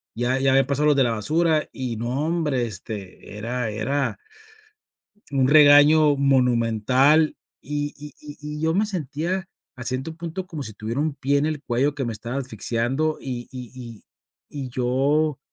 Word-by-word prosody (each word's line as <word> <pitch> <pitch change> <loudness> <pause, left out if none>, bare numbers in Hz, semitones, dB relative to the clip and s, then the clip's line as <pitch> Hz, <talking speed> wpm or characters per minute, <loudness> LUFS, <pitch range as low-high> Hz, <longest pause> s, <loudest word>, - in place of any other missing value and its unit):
ya 120 +3 0
ya 135 0 +3
habían 135 0 +4
pasado 145 +2 +1
los 145 - +4
de 135 - +5
la 120 - +1
basura 155 +8 +1
y 125 -3 -4
no, 125 +6 -2
hombre, 150 -8 0
este, 100 0 -8
era 120 +1 -2
era 135 +6 -1 1.2
un 130 -1 +2
regaño 145 0 +7
monumental 130 +2 +3 0.3
y 145 +1 -3
y 150 0 -10
y 150 -1 -10 0.2
y - - -6
yo 160 +1 +1
me 205 +4 +2
sentía, 180 +1 -3 0.3
a 125 - -9
ciento 130 +6 -3
punto 170 +2 -5
como 160 -6 -6
si 110 - -8
tuviera 115 +6 -4
un 155 -1 -1
pie 140 +1 +1
en 145 - +1
el 155 -2 -3
cuello 135 +5 0
que 140 -3 -3
me 115 - -3
estaba 115 +4 -5
asfixiando 130 +4 -1
y 125 -3 -6
y 125 -3 -8
y 120 -4 -10 0.6
y - - -7
yo 135 +4 +1
135 Hz, 170 wpm, -23 LUFS, 120-150 Hz, 1.2 s, regaño